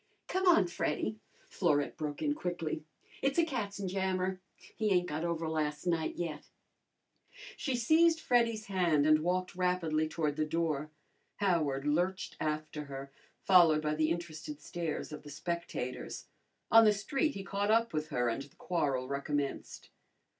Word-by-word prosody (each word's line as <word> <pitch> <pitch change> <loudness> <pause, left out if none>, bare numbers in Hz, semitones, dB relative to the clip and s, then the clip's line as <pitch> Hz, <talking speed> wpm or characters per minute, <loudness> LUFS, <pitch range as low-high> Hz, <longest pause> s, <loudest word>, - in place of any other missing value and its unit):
"Come 375 0 0
on, 330 - +6
Freddy," 215 +4 -2 0.3
Florette 150 -6 +1
broke 150 -2 -4
in 290 - +2
quickly. 175 - -3 0.4
"It's 275 0 +1
a 335 - +5
katzenjammer. 190 - -2 0.4
He 220 -1 0
ain't 180 -2 +3
got 155 +2 -3
over 165 -1 -1
last 150 -1 -2
night 165 -3 0
yet." 155 -4 -5 1.1
She 265 -4 -2
seized 320 +7 +4
Freddy's 230 -5 +2
hand 175 -7 +2
and 155 0 +6
walked 180 +2 -1
rapidly 175 -4 +1
toward 155 -2 -1
the 155 - +2
door. 155 -2 -1 0.5
Howard 155 -9 +1
lurched 175 +6 0
after 155 -1 -3
her, 135 0 -7 0.3
followed 170 -5 +6
by 150 0 +1
the 155 0 +1
interested 160 -3 -4
stares 160 0 -4
of 150 - -7
the 145 - -11
spectators. 155 -4 -4 0.5
On 225 0 +9
the 215 -1 +6
street 270 +9 -1
he 195 - -5
caught 200 +1 -1
up 230 -1 +3
with 155 0 -1
her 125 -5 0
and 115 +3 -1
the 140 - -13
quarrel 140 -8 -1
recommenced. 140 +1 -3
170 Hz, 150 wpm, -32 LUFS, 150-195 Hz, 1.1 s, On